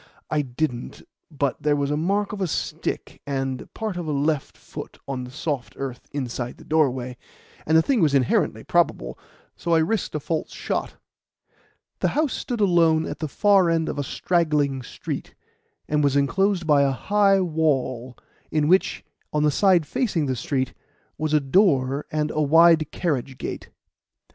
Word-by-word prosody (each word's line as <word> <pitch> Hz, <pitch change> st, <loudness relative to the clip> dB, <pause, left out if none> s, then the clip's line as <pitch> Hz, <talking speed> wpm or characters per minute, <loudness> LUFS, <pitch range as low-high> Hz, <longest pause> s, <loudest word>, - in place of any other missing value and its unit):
"I 150 Hz, -1 st, +2 dB
didn't; 125 Hz, -1 st, -4 dB, 0.3 s
but 140 Hz, -4 st, -2 dB
there 150 Hz, -1 st, +2 dB
was 140 Hz, 0 st, -1 dB
the -, -, +1 dB
mark 195 Hz, +6 st, 0 dB
of 200 Hz, -, -5 dB
a 185 Hz, -, +1 dB
stick -, -, -4 dB
and 135 Hz, -2 st, -3 dB
part 215 Hz, -5 st, -3 dB
of 175 Hz, -2 st, -4 dB
a -, -, -1 dB
left 145 Hz, 0 st, -1 dB
foot -, -, -9 dB
on 130 Hz, -2 st, -3 dB
the -, -, -10 dB
soft 140 Hz, -1 st, -4 dB
earth 130 Hz, -2 st, -6 dB
inside 125 Hz, -3 st, -4 dB
the -, -, -14 dB
doorway, 130 Hz, -5 st, 0 dB, 0.5 s
and 160 Hz, +1 st, +5 dB
the 160 Hz, -, +5 dB
thing 255 Hz, 0 st, +2 dB
was 150 Hz, -4 st, +3 dB
inherently 130 Hz, -3 st, +1 dB
probable, -, -, 0 dB, 0.4 s
so 170 Hz, -1 st, 0 dB
I -, -, +5 dB
risked 165 Hz, +2 st, 0 dB
a -, -, 0 dB
false 160 Hz, +2 st, -3 dB
shot." -, -, -3 dB, 1.0 s
The -, -, +2 dB
house 305 Hz, -3 st, +2 dB
stood 245 Hz, -3 st, -4 dB
alone 165 Hz, -4 st, +4 dB
at -, -, -6 dB
the 155 Hz, -, -2 dB
far 195 Hz, +2 st, +4 dB
end 165 Hz, -1 st, +1 dB
of -, -, -4 dB
a -, -, 0 dB
straggling 150 Hz, -4 st, 0 dB
street, 125 Hz, -, -6 dB, 0.5 s
and 150 Hz, 0 st, +1 dB
was 140 Hz, -1 st, +2 dB
enclosed 180 Hz, +6 st, +1 dB
by 150 Hz, -2 st, +4 dB
a 140 Hz, -, +3 dB
high 195 Hz, +8 st, +3 dB
wall, 135 Hz, -8 st, -1 dB, 0.3 s
in 150 Hz, -1 st, +1 dB
which, 185 Hz, +4 st, +2 dB, 0.3 s
on 150 Hz, 0 st, +1 dB
the 150 Hz, -, +4 dB
side 180 Hz, 0 st, +4 dB
facing 175 Hz, -, 0 dB
the 130 Hz, -2 st, -1 dB
street, 130 Hz, +2 st, -2 dB, 0.5 s
was 155 Hz, 0 st, -1 dB
a 155 Hz, -, +4 dB
door 140 Hz, -3 st, +2 dB
and 150 Hz, -1 st, -1 dB
a 155 Hz, -, -1 dB
wide 160 Hz, +1 st, +5 dB
carriage 135 Hz, -6 st, -2 dB
gate. -, -, -6 dB
150 Hz, 170 wpm, -24 LUFS, 135-170 Hz, 1.0 s, and